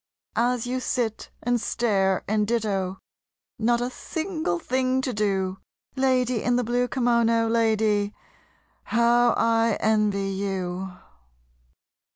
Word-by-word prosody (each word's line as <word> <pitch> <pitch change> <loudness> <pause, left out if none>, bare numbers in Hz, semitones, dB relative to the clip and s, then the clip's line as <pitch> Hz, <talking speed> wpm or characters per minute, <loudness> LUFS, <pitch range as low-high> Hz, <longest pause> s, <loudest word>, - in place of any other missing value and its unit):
As 245 0 +1
you 255 +1 -2
sit 240 -4 -2
and 245 -1 +1
stare 195 -6 +1
and 210 0 +1
ditto, 200 -5 -1 0.6
not 235 +2 +2
a 245 +1 -2
single 315 - -3
thing 255 +6 0
to 260 -1 -2
do, 195 -3 -1 0.4
Lady 255 -3 +1
in 245 - +1
the 250 - +1
blue 245 +2 0
kimono, 235 -3 +2
lady, 220 -2 +2 0.7
how 235 +1 +3
I 230 -1 +2
envy 210 -2 +1
you! 190 -1 -3
230 Hz, 115 wpm, -25 LUFS, 205-245 Hz, 0.7 s, how